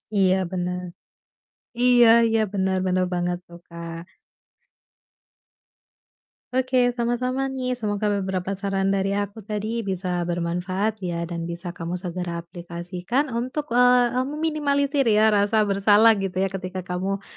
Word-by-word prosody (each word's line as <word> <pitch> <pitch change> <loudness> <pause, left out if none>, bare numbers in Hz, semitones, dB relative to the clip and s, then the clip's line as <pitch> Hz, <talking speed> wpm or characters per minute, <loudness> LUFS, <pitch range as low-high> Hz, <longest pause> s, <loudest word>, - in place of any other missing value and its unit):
Iya, 190 -2 +4 0.2
bener. 180 0 -2 1.0
Iya 245 -1 +6 0.2
iya, 225 0 +2
bener 190 -1 0
bener 185 0 +2
banget 175 0 -1
tuh, 170 0 -13
Kak. 170 -1 -8 2.6
Oke, 255 -1 +2
sama-sama 250 +2 -1
nih, 255 -2 -3
semoga 210 -1 -1
beberapa 190 -1 -2
saran 195 -1 0
dari 195 0 0
aku 205 +1 -3
tadi 215 +2 -3
bisa 185 -1 -2
bermanfaat 180 +5 -2
ya, 175 -2 -3
dan 170 0 -4
bisa 170 +1 -5
kamu 170 0 -5
segera 175 -2 -4
aplikasikan 175 - -3
untuk, 255 +4 -3
eee 245 0 +5
eee, 255 +1 0
meminimalisir 285 -3 0
ya, 215 0 +5
rasa 210 +1 +3
bersalah 205 +2 +5
gitu 190 -1 -1
ya, 195 - -1
ketika 185 -1 -5
kamu, 190 +2 -3
195 Hz, 130 wpm, -24 LUFS, 180-240 Hz, 2.6 s, Iya